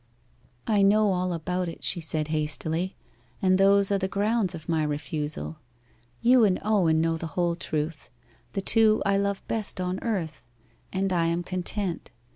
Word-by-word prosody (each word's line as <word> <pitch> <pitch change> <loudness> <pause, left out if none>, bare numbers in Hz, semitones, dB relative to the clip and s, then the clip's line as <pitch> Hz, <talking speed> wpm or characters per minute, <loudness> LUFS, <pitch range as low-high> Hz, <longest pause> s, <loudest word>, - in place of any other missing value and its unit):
'I 210 -2 +2
know 205 +1 +4
all 180 0 -1
about 180 +2 -2
it,' 165 - -10
she 175 - 0
said 155 -1 0
hastily; 160 +4 -1 0.4
'and 185 0 +3
those 200 0 +4
are 200 - +2
the 190 - -1
grounds 200 -1 0
of 160 -1 -10
my 165 -2 +1
refusal. 150 - -3 0.6
You 245 0 +6
and 195 -4 +3
Owen 180 -7 +3
know 165 0 +1
the 160 0 -8
whole 175 -1 +1
truth 155 -2 -4 0.4
the 195 - -1
two 220 +1 +4
I 200 0 +3
love 200 0 -2
best 215 -4 -2
on 185 +1 -2
earth 180 -9 -3 0.5
and 190 0 -1
I 170 -2 +2
am 170 +1 -1
content. 185 0 -3
180 Hz, 165 wpm, -26 LUFS, 160-200 Hz, 0.6 s, You